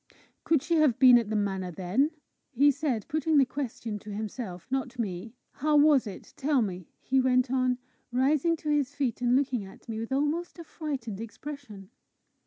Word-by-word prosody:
"Could 315 Hz, -4 st, +2 dB
she 335 Hz, 0 st, +1 dB
have 300 Hz, -7 st, +4 dB
been 250 Hz, -2 st, +8 dB
at 225 Hz, -3 st, -4 dB
the 220 Hz, -, -1 dB
manor 195 Hz, -3 st, -1 dB
then?" 190 Hz, -, 0 dB, 0.4 s
he 285 Hz, +2 st, +4 dB
said, 270 Hz, -7 st, -2 dB
putting 310 Hz, 0 st, +1 dB
the 275 Hz, -, +6 dB
question 240 Hz, -5 st, -5 dB
to 210 Hz, -, -12 dB
himself, 205 Hz, -3 st, -5 dB
not 260 Hz, -2 st, -2 dB
me. 215 Hz, +1 st, -4 dB, 0.2 s
"How 300 Hz, +2 st, +1 dB
was 290 Hz, -5 st, +5 dB
it? 195 Hz, -, -9 dB
Tell 275 Hz, -3 st, +2 dB
me," 185 Hz, -4 st, -5 dB
he 265 Hz, 0 st, +1 dB
went 255 Hz, -1 st, +2 dB
on, 255 Hz, -1 st, +1 dB, 0.3 s
rising 285 Hz, +6 st, +2 dB
to 305 Hz, -, -5 dB
his 285 Hz, -1 st, 0 dB
feet, 260 Hz, -4 st, -1 dB
and 245 Hz, 0 st, +3 dB
looking 260 Hz, -5 st, +1 dB
at 190 Hz, -, -14 dB
me 220 Hz, -1 st, -4 dB
with 225 Hz, +3 st, -5 dB
almost 295 Hz, +7 st, -1 dB
a 335 Hz, -, -8 dB
frightened 265 Hz, -11 st, -5 dB
expression. 225 Hz, -4 st, -9 dB
255 Hz, 185 wpm, -28 LUFS, 220-290 Hz, 0.4 s, been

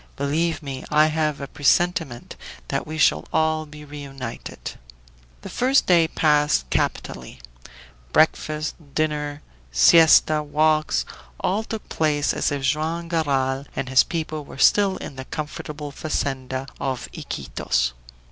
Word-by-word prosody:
"Believe 155 Hz, +4 st, -1 dB
me, 135 Hz, -2 st, -6 dB
I 150 Hz, +1 st, +5 dB
have 155 Hz, -1 st, 0 dB
a 140 Hz, -, -5 dB
presentiment 160 Hz, -2 st, 0 dB, 0.3 s
that -, -, -2 dB
we 155 Hz, +1 st, -5 dB
shall 155 Hz, -, +3 dB
all 160 Hz, -1 st, +1 dB
be 150 Hz, 0 st, -11 dB
reunited!" 140 Hz, -4 st, -7 dB, 0.7 s
The -, -, -7 dB
first 265 Hz, +3 st, +2 dB
day 170 Hz, -3 st, +5 dB
passed 150 Hz, -, +2 dB
capitally; -, -, -2 dB, 0.7 s
breakfast, 155 Hz, -1 st, +2 dB, 0.2 s
dinner, 150 Hz, -1 st, -1 dB, 0.3 s
siesta, 155 Hz, -, +6 dB
walks, 155 Hz, -, +1 dB, 0.3 s
all 205 Hz, +4 st, 0 dB
took 220 Hz, -1 st, -6 dB
place 150 Hz, -2 st, +1 dB
as -, -, 0 dB
if 140 Hz, -1 st, -3 dB
Joam 160 Hz, +5 st, -1 dB
Garral 140 Hz, -4 st, 0 dB
and 130 Hz, -, -3 dB
his 130 Hz, -1 st, +6 dB
people 155 Hz, -2 st, -4 dB
were 140 Hz, -, -12 dB
still 195 Hz, +6 st, +4 dB
in 135 Hz, -, -8 dB
the 130 Hz, -, -6 dB
comfortable 150 Hz, -1 st, -6 dB
fazenda 135 Hz, -3 st, -3 dB
of 130 Hz, -2 st, -3 dB
Iquitos. -, -, -2 dB
150 Hz, 130 wpm, -23 LUFS, 135-160 Hz, 0.7 s, siesta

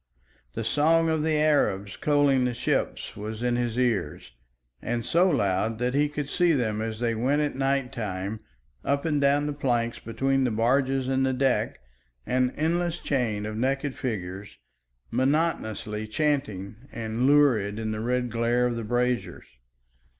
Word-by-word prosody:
The -, -, -3 dB
song 165 Hz, +2 st, +3 dB
of 160 Hz, -1 st, +1 dB
the 155 Hz, 0 st, +1 dB
Arabs 120 Hz, -11 st, +1 dB
coaling 145 Hz, -3 st, +3 dB
the 125 Hz, -1 st, -1 dB
ship 120 Hz, -, 0 dB, 0.2 s
was 110 Hz, +2 st, -6 dB
in 120 Hz, -1 st, +1 dB
his 120 Hz, -1 st, -1 dB
ears, 120 Hz, -, -1 dB, 0.5 s
and 120 Hz, 0 st, -2 dB
so 175 Hz, +7 st, +3 dB
loud 100 Hz, -, +1 dB
that 125 Hz, +2 st, -1 dB
he 145 Hz, +1 st, +2 dB
could 150 Hz, -1 st, -4 dB
see 175 Hz, +2 st, +2 dB
them 110 Hz, -6 st, 0 dB
as 110 Hz, 0 st, -4 dB
they 120 Hz, -1 st, 0 dB
went 135 Hz, +7 st, +1 dB
at 145 Hz, -, -1 dB
night 135 Hz, -1 st, 0 dB
time 105 Hz, -3 st, -4 dB, 0.4 s
up 140 Hz, +2 st, 0 dB
and 150 Hz, -3 st, +1 dB
down 140 Hz, +1 st, +3 dB
the 150 Hz, -, -2 dB
planks 120 Hz, -5 st, -1 dB
between 135 Hz, +3 st, 0 dB
the 125 Hz, -, +2 dB
barges 130 Hz, +4 st, +1 dB
and 135 Hz, 0 st, +1 dB
the 130 Hz, 0 st, +1 dB
deck, 130 Hz, -, 0 dB, 0.4 s
an 125 Hz, 0 st, +1 dB
endless 170 Hz, +2 st, 0 dB
chain 115 Hz, -7 st, -1 dB
of 110 Hz, 0 st, -4 dB
naked 135 Hz, +4 st, -1 dB
figures 100 Hz, -4 st, -5 dB, 0.5 s
monotonously 120 Hz, -6 st, 0 dB
chanting 110 Hz, -6 st, -1 dB
and 115 Hz, +3 st, -1 dB
lurid 125 Hz, -9 st, +4 dB
in 110 Hz, -1 st, -3 dB
the 110 Hz, -, -3 dB
red 125 Hz, +1 st, -1 dB
glare 120 Hz, +1 st, +1 dB
of 120 Hz, -1 st, 0 dB
the 115 Hz, -, -4 dB
braziers. 120 Hz, +2 st, -1 dB
125 Hz, 160 wpm, -26 LUFS, 110-145 Hz, 0.5 s, lurid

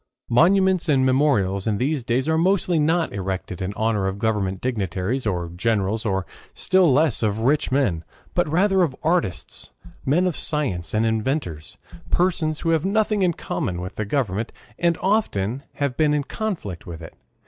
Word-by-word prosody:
Monuments 185 Hz, +6 st, +4 dB
and 135 Hz, -3 st, +3 dB
memorials 115 Hz, -8 st, +2 dB
in 105 Hz, -2 st, +1 dB
these 135 Hz, +3 st, -1 dB
days 125 Hz, +4 st, 0 dB
are 160 Hz, -, +2 dB
mostly 175 Hz, 0 st, +2 dB
not 160 Hz, 0 st, +1 dB
erected 95 Hz, -2 st, -4 dB
in 95 Hz, +1 st, -2 dB
honor 110 Hz, -3 st, 0 dB
of 95 Hz, +1 st, -3 dB
government 100 Hz, -4 st, -1 dB
dignitaries, 105 Hz, +1 st, -2 dB
or 90 Hz, -4 st, -2 dB
generals, 105 Hz, +1 st, 0 dB
or 95 Hz, -3 st, 0 dB, 0.3 s
still 185 Hz, -4 st, +3 dB
less 145 Hz, -1 st, +3 dB
of 110 Hz, -1 st, 0 dB
rich 140 Hz, +5 st, +1 dB
men, 105 Hz, -, +1 dB, 0.3 s
but -, -, +1 dB
rather 190 Hz, +3 st, +3 dB
of 155 Hz, -7 st, +1 dB
artists, 165 Hz, -, -2 dB, 0.3 s
men 160 Hz, +7 st, +2 dB
of 180 Hz, -4 st, 0 dB
science, 110 Hz, -, -2 dB
and 110 Hz, +1 st, +2 dB
inventors, 110 Hz, -, -2 dB, 0.3 s
persons 165 Hz, -, +1 dB
who 165 Hz, -, +1 dB
have 160 Hz, -2 st, +2 dB
nothing 210 Hz, +1 st, +1 dB
in 180 Hz, -2 st, +3 dB
common 110 Hz, -, -3 dB
with 90 Hz, +2 st, -6 dB
the 110 Hz, -, -3 dB
government, 110 Hz, -2 st, -1 dB, 0.3 s
and 170 Hz, -1 st, +2 dB
often 135 Hz, -, 0 dB
have 140 Hz, -2 st, -1 dB
even -, -, -19 dB
been 150 Hz, -2 st, +3 dB
in 145 Hz, -, 0 dB
conflict 160 Hz, -, -5 dB
with 85 Hz, -1 st, -8 dB
it. 80 Hz, -, -10 dB
130 Hz, 170 wpm, -23 LUFS, 100-165 Hz, 0.3 s, Monuments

